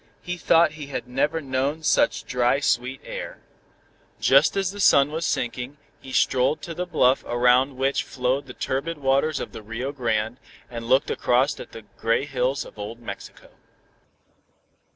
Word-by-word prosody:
He 180 - -3
thought 170 -1 +4
he 150 -2 -8
had 140 - -5
never 145 +6 0
known 140 +3 -2
such - - +2
dry 125 +2 +1
sweet 130 -1 0
air. - - -6 0.8
Just 140 +7 +4
as 195 -2 0
the 205 - -9
sun 140 -6 +5
was 160 +1 -2
sinking, 125 +4 -3 0.2
he 130 - -11
strolled 130 +3 +2
to 170 - -5
the 180 +2 -4
bluff 130 -6 +3
around 125 +2 +3
which 135 +1 +1
flowed 130 +2 -2
the 125 - -10
turbid 140 +5 -2
waters 140 +2 +1
of - - -5
the - - -9
Rio 115 +5 -4
Grande, 115 -3 -1 0.3
and 115 -1 -6
looked 130 +1 +3
across 130 +4 +1
at - - -9
the 115 - -10 0.2
gray 115 +4 +1
hills 135 -1 -1
of - - -14
old 110 +3 -6
Mexico. 120 - -9
135 Hz, 165 wpm, -24 LUFS, 125-145 Hz, 0.8 s, sun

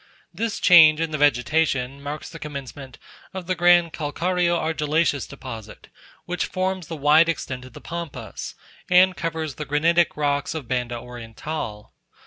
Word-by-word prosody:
This 215 +4 -3
change 160 -4 +7
in 165 -1 -1
the 155 - -3
vegetation 140 -1 +1
marks 145 +2 -6
the 165 - -10
commencement 140 -2 -8 0.4
of 185 -2 -5
the 185 - 0
grand 175 -1 +4
calcareo 175 +3 0
argillaceous 155 -2 0
deposit, 115 -6 -10 0.4
which 180 0 -2
forms 185 -2 -2
the 165 - -5
wide 150 +3 +5
extent 130 -5 -4
of 130 - -14
the - - -11
Pampas, 155 -9 -7 0.3
and 180 +1 +5
covers 160 -3 -3
the 150 - -6
granitic 165 +4 +2
rocks 145 +2 -1
of 150 -6 -6
Banda 125 -1 -2
Oriental. 120 -1 -7
155 Hz, 145 wpm, -23 LUFS, 135-170 Hz, 0.4 s, change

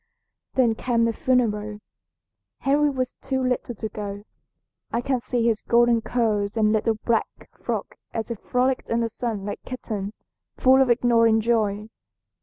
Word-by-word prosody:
"Then 245 -4 +4
came 230 0 +1
the 230 - +1
funeral. 215 -5 0 0.8
Henry 290 +2 +3
was 255 -2 -2
too 265 -1 -1
little 250 -1 -1
to 220 - -4
go. 205 -1 -6 0.7
I 235 - 0
can 250 0 -1
see 240 -1 -1
his 225 -2 +2
golden 235 -1 +3
curls 215 -3 0
and 215 -1 +3
little 220 +1 +1
black 230 -2 +2 0.3
frock - - -5
as 225 0 -4
he - - -1
frolicked 250 +4 -1
in 230 0 +1
the 230 - 0
sun 220 -3 -4
like 205 - -4
a - - -13
kitten, 215 -5 -4 0.4
full 265 +1 +5
of 265 - +3
ignorant 230 -2 +4
joy. 215 -2 0
230 Hz, 160 wpm, -24 LUFS, 215-250 Hz, 0.8 s, full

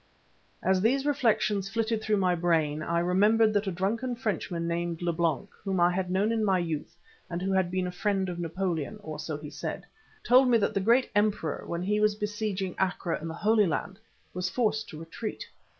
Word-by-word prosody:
As 190 0 +3
these 265 +6 +2
reflections 215 -8 +1
flitted 225 0 -1
through 215 -1 +1
my 185 -2 +2
brain 160 -3 +1
I 170 +2 -1
remembered 210 +5 +4
that 205 0 +1
a - - 0
drunken 225 +8 -1
Frenchman 195 -7 -2
named 170 0 -2
Leblanc, 170 +3 0
whom 195 -2 -1
I 175 +1 +5
had 185 0 -2
known 195 +4 +1
in 225 -1 +1
my 195 -3 +3
youth 165 -1 -3 0.3
and 170 - -3
who 190 +2 -1
had 190 -2 +2
been 185 0 -1
a 180 - -3
friend 195 +1 0
of 175 -1 -4
Napoleon, 175 +1 -2
or 155 -1 -6
so 155 -1 -4
he 150 0 -9
said, 145 - -5 0.4
told 255 +2 +6
me 240 -2 +5
that 205 - 0
the - - +1
great 235 +6 +3
emperor 205 -7 0
when 170 +1 -3
he 210 +3 +1
was 210 -1 +3
besieging 210 -3 -3
Acre 180 -2 0
in 165 - -4
the 160 - -5
Holy 210 +2 +3
Land, 185 +5 -3 0.3
was 180 +1 -2
forced 220 0 0
to 155 - -8
retreat. 165 +7 -6
190 Hz, 200 wpm, -28 LUFS, 170-215 Hz, 0.4 s, told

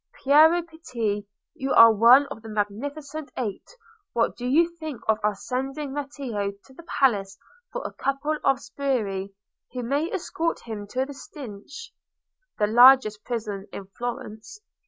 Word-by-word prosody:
Piero 315 +5 +6
Pitti, 235 -11 -4 0.3
you 270 0 -2
are 230 0 +9
one 235 +6 +7
of 225 - -7
the 220 - -10
Magnificent 280 +9 -4
Eight, 215 -6 -4 0.5
what 230 - +1
do 245 - -5
you 335 +6 +3
think 310 -7 -6
of 220 -1 +2
our 210 -1 +1
sending 270 +6 -4
Matteo 265 -8 -4
to 265 - -18
the 300 - -12
palace 205 -11 0 0.3
for - - -5
a - - -5
couple 290 +3 -2
of 270 -1 +3
sbirri, 210 -10 -2 0.4
who 250 -1 -4
may 285 +8 -1
escort 335 -3 -2
him 210 -3 -7
to 255 +5 -1
the 285 - -9
Stinche? 275 - -10 0.7
(The 210 - +2
largest 230 -1 +6
prison 210 -5 -4
in 195 -1 -8
Florence.) 240 - -6
255 Hz, 150 wpm, -25 LUFS, 215-285 Hz, 0.7 s, are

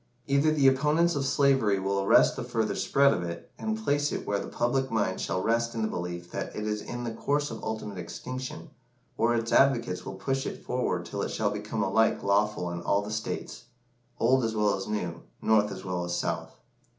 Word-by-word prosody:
Either 140 +3 +3
the 145 -3 +4
opponents 150 +6 +3
of 135 -1 0
slavery 135 -8 +3
will 100 +1 0
arrest 95 - +5
the - - -4
further 110 -1 -1
spread 140 0 +4
of 90 - -2
it, 85 -1 -6
and 220 0 -1
place 145 -4 +1
it - - -3
where 100 -1 0
the - - -5
public 130 +3 0
mind 100 -4 0
shall 95 - -1
rest 115 +1 +1
in 110 - -1
the - - +1
belief 85 -3 -5
that - - -4
it 105 - -3
is 105 0 -1
in 120 +2 -6
the 120 - -3
course 145 +5 0
of 110 - -7
ultimate 105 -3 -4
extinction, 125 +9 -6 0.4
or 120 +1 +2
its 115 0 -1
advocates 120 -9 +3
will 95 - -6
push 135 +7 -2
it - - -7
forward 125 0 -1
till - - -4
it - - -2
shall - - 0
become - - -3
alike 110 0 +2
lawful 100 -3 +1
in 85 0 -4
all 100 +4 +1
the 105 - -6
States 110 +2 -4 0.5
old 130 +2 +4
as 110 -1 -1
well 105 -1 +3
as 95 - -5
new, 105 -5 -3 0.2
North 105 -1 +3
as 95 0 -7
well 90 -1 -2
as 85 0 -2
South. - - -3
110 Hz, 210 wpm, -28 LUFS, 100-130 Hz, 0.5 s, arrest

